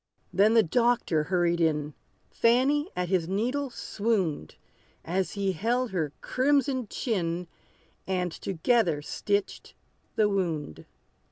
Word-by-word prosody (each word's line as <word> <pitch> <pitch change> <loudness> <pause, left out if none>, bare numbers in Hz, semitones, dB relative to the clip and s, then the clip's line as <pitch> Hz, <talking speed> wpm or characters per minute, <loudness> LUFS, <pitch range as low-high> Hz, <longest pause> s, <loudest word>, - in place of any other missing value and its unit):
Then 205 +5 +4
the 225 - +6
doctor 225 -5 +1
hurried 175 -1 +1
in: 150 -2 +1 0.4
Fanny 270 +7 +2
at 180 -1 -2
his 180 -4 +1
needle 250 +8 -1
swooned, 200 - -2 0.5
As 185 +3 -1
he 200 -1 0
held 235 +7 -1
her 160 -6 -1
crimson 265 -2 +1
chin, 180 -7 -2 0.6
And 180 -2 -1
together 175 -3 0
stitched 205 +5 -2 0.4
the 215 - +4
wound. 170 - -2
195 Hz, 110 wpm, -27 LUFS, 170-235 Hz, 0.6 s, the